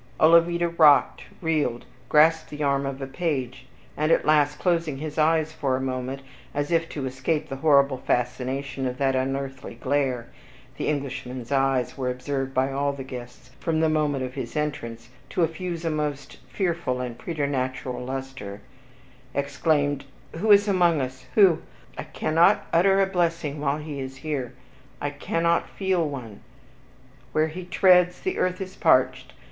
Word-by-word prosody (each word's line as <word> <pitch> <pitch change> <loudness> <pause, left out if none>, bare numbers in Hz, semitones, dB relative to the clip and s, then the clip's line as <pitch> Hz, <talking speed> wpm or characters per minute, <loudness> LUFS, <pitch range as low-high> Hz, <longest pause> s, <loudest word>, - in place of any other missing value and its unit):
Olavida 170 +2 +5
rocked, 155 -4 +4 0.2
reeled, 150 -7 0 0.2
grasped 160 +2 +4
the 150 0 -4
arm 140 -1 +1
of 135 0 -5
a - - -2
page, 135 -4 -3 0.3
and 155 +2 +1
at - - +3
last, 150 -1 +3
closing 165 -5 0
his 155 +2 -5
eyes 160 0 +3
for 135 -4 0
a - - -2
moment, 130 +1 -3 0.3
as 145 +2 -1
if 165 0 +1
to 140 -3 -4
escape 135 +4 -2
the 135 - -5
horrible 140 -2 +4
fascination 130 +2 -2
of 125 0 -4
that 135 -1 +1
unearthly 135 -1 -3
glare 130 -1 -1 0.5
(the - - -2
Englishman's 130 -4 -4
eyes 135 -1 +1
were 130 -1 0
observed 135 +1 -3
by 130 +1 +1
all 140 +1 0
the 140 -1 -6
guests, 125 -1 -10
from 160 -2 0
the 160 0 +3
moment 150 -3 0
of 130 0 -5
his 125 -4 -6
entrance, 120 -6 -4 0.2
to 180 - +1
effuse 170 +1 -3
a 165 - +1
most 150 -2 -3
fearful 170 -9 -1
and 120 -2 -5
preternatural 130 -5 -3
luster), 130 -6 -6 0.7
exclaimed, 145 0 0 0.3
"Who 215 +6 -1
is 205 +1 +7
among 175 -5 +3
us? 130 0 -5
Who? 195 -6 +6 0.3
I - - -6
cannot 170 +6 +2
utter 195 +3 +4
a - - +4
blessing 170 -5 -1
while 140 0 +1
he 150 -2 -6
is 130 0 -6
here. 140 -6 -3 0.5
I 145 - -2
cannot 165 +3 0
feel 185 -5 0
one. 120 -7 -7 0.9
Where 155 +1 +2
he 180 +3 -7
treads, 180 -1 +4
the 375 - -2
earth 185 0 0
is 190 -1 -6
parched! 130 0 +2
145 Hz, 160 wpm, -25 LUFS, 130-165 Hz, 0.9 s, is